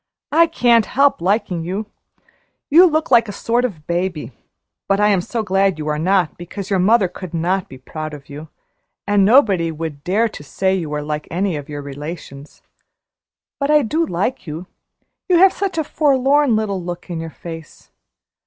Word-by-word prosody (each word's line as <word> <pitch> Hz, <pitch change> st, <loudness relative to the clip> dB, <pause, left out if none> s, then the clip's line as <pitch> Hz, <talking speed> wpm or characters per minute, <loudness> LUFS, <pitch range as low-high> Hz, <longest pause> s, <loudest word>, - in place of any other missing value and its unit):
"I 330 Hz, +3 st, +5 dB
can't 240 Hz, -8 st, +3 dB
help 280 Hz, -7 st, +2 dB
liking 185 Hz, -2 st, 0 dB
you. 190 Hz, +6 st, -3 dB, 0.9 s
You 350 Hz, +5 st, +8 dB
look 315 Hz, -2 st, -1 dB
like 230 Hz, -3 st, +5 dB
a -, -, -3 dB
sort 235 Hz, +4 st, 0 dB
of 175 Hz, -12 st, -4 dB
baby, 170 Hz, -3 st, -2 dB, 0.6 s
but 195 Hz, 0 st, +2 dB
I 210 Hz, 0 st, +4 dB
am 195 Hz, -3 st, +2 dB
so 225 Hz, +5 st, -3 dB
glad 195 Hz, -3 st, +1 dB
you 155 Hz, -1 st, -5 dB
are 150 Hz, 0 st, -1 dB
not, 180 Hz, 0 st, +1 dB
because 195 Hz, +3 st, -7 dB
your 195 Hz, -, +2 dB
mother 205 Hz, +2 st, +4 dB
could 180 Hz, -1 st, -8 dB
not 180 Hz, +3 st, -1 dB
be 130 Hz, -, -11 dB
proud 155 Hz, +3 st, -7 dB
of 140 Hz, -1 st, -14 dB
you, 150 Hz, +2 st, -9 dB, 0.6 s
and 205 Hz, -1 st, +3 dB
nobody 195 Hz, -7 st, +4 dB
would 155 Hz, -2 st, -6 dB
dare 205 Hz, +7 st, +1 dB
to 210 Hz, -, -10 dB
say 190 Hz, +6 st, -1 dB
you 175 Hz, -5 st, -2 dB
were 150 Hz, 0 st, -3 dB
like 150 Hz, 0 st, -4 dB
any 185 Hz, 0 st, -1 dB
of 145 Hz, 0 st, -7 dB
your 145 Hz, -1 st, -6 dB
relations. 145 Hz, 0 st, -9 dB, 1.0 s
But 280 Hz, 0 st, -1 dB
I 300 Hz, -1 st, +5 dB
do 315 Hz, +9 st, 0 dB
like 200 Hz, -, -2 dB
you; 160 Hz, +4 st, -6 dB, 0.6 s
you 360 Hz, -, +5 dB
have 380 Hz, +2 st, +6 dB
such 390 Hz, -4 st, -3 dB
a 320 Hz, -, +1 dB
forlorn 280 Hz, -3 st, +2 dB
little 205 Hz, -3 st, -1 dB
look 175 Hz, +1 st, -7 dB
in 165 Hz, -, -3 dB
your 165 Hz, 0 st, -5 dB
face. 165 Hz, 0 st, -11 dB
190 Hz, 185 wpm, -19 LUFS, 160-235 Hz, 1.0 s, You